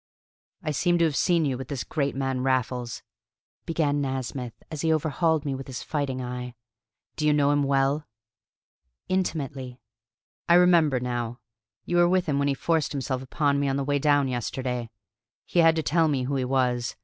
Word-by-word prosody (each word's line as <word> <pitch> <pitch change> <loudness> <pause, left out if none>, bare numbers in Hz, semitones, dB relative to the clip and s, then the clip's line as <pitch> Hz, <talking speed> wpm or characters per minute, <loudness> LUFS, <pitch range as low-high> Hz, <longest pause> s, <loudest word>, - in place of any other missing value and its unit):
"I 155 - -1
seem 175 +4 +2
to 170 - +3
have 155 -3 0
seen 170 0 +2
you 130 -3 -1
with 130 - -6
this 140 -4 -3
great 140 -4 -2
man 135 -1 -1
Raffles," 125 -2 -1 0.6
began 150 -4 +1
Nasmyth, 130 -3 -4 0.2
as 155 -2 -4
he 160 - +2
overhauled 160 0 +1
me 140 - -1
with 135 0 -6
his 130 -2 -6
fighting 135 -4 -2
eye. 125 0 -5 0.6
"Do 150 - +1
you - - +5
know 145 -1 +3
him 145 0 +2
well?" 140 +2 +1 1.0
"Intimately." 140 -9 -2 0.7
"I 170 - +7
remember 170 -7 +5
now. 120 -1 -3 0.5
You 175 - 0
were 175 0 +5
with 185 0 +2
him 145 -4 0
when 140 - +1
he 140 - +1
forced 160 +1 0
himself 130 -2 -2
upon 140 +1 0
me 140 - +1
on 135 - 0
the 140 - -1
way 145 +1 0
down 145 -1 +3
yesterday. 125 -1 -3 0.6
He 175 - 0
had 165 -1 +6
to 160 - -1
tell 165 +2 +3
me 140 -4 0
who 140 +2 -2
he 130 -1 0
was. 125 -2 0
140 Hz, 185 wpm, -26 LUFS, 130-155 Hz, 1.0 s, I